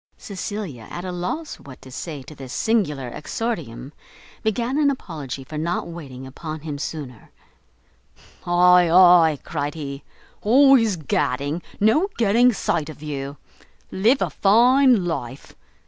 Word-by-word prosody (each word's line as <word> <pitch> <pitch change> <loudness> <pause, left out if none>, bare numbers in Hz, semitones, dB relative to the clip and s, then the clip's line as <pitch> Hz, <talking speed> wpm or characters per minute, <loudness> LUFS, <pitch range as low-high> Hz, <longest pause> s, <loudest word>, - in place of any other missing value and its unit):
Cecilia, 195 - -6
at 175 +1 -6
a 185 - -4
loss 180 - -4
what 135 -2 -13
to 130 - -12
say 145 0 -6
to 155 - -12
this 135 -3 -9
singular 150 - 0
exordium, 150 - -5 0.5
began 235 +6 -1
an 290 -2 +4
apology 150 - -5
for 150 +3 -7
not 170 +3 -2
waiting 140 -7 -9
upon 155 +3 -7
him 150 -2 -6
sooner. 140 -7 -7 1.2
"Ay, 180 0 +5
ay," 175 -3 +6
cried 145 -1 -4
he, 140 -2 -6 0.4
"always 245 -2 +5
gadding, 145 0 -1 0.2
no 225 - +3
getting 235 +3 +4
sight 160 -7 -2
of 155 -1 -11
you. 140 -1 -5 0.5
Live 225 +8 +2
a - - -3
fine 240 +1 +4
life! 135 -6 -5
170 Hz, 130 wpm, -22 LUFS, 145-215 Hz, 1.2 s, ay